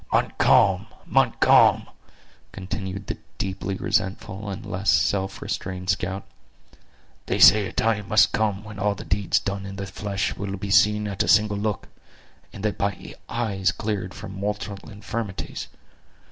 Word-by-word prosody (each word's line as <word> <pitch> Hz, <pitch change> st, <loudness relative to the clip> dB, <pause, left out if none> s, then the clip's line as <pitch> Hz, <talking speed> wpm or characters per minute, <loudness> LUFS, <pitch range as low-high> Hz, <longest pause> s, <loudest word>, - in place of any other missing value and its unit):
"Montcalm! -, -, +3 dB, 0.2 s
Montcalm!" -, -, +4 dB, 0.7 s
continued 95 Hz, +1 st, -5 dB
the -, -, -5 dB, 0.2 s
deeply 95 Hz, 0 st, -3 dB
resentful 100 Hz, 0 st, -2 dB
and 95 Hz, -, -6 dB
less 95 Hz, +3 st, -2 dB
self 95 Hz, -1 st, +1 dB
restrained 90 Hz, 0 st, -3 dB
scout; 95 Hz, 0 st, -3 dB, 1.0 s
"they -, -, 0 dB
say 105 Hz, -1 st, +7 dB
a -, -, -7 dB
time 105 Hz, -3 st, 0 dB
must 105 Hz, +1 st, +5 dB
come 105 Hz, -2 st, 0 dB
when 105 Hz, -1 st, -9 dB
all 105 Hz, 0 st, +1 dB
the -, -, -9 dB
deeds 100 Hz, +1 st, +1 dB
done 100 Hz, 0 st, -4 dB
in 95 Hz, 0 st, -7 dB
the 100 Hz, 0 st, -5 dB
flesh 100 Hz, +1 st, -3 dB
will 100 Hz, 0 st, -4 dB
be 100 Hz, +1 st, -5 dB
seen 105 Hz, +1 st, +4 dB
at 100 Hz, -2 st, -2 dB
a -, -, 0 dB
single 105 Hz, 0 st, +4 dB
look; 105 Hz, 0 st, -2 dB, 0.6 s
and 100 Hz, -, -7 dB
that 105 Hz, -, -1 dB
by 100 Hz, -2 st, -3 dB, 0.2 s
eyes 105 Hz, -5 st, 0 dB
cleared 100 Hz, -3 st, -4 dB
from 100 Hz, -, -8 dB
mortal 100 Hz, 0 st, -4 dB
infirmities. 105 Hz, -1 st, -5 dB
100 Hz, 145 wpm, -24 LUFS, 95-105 Hz, 1.0 s, say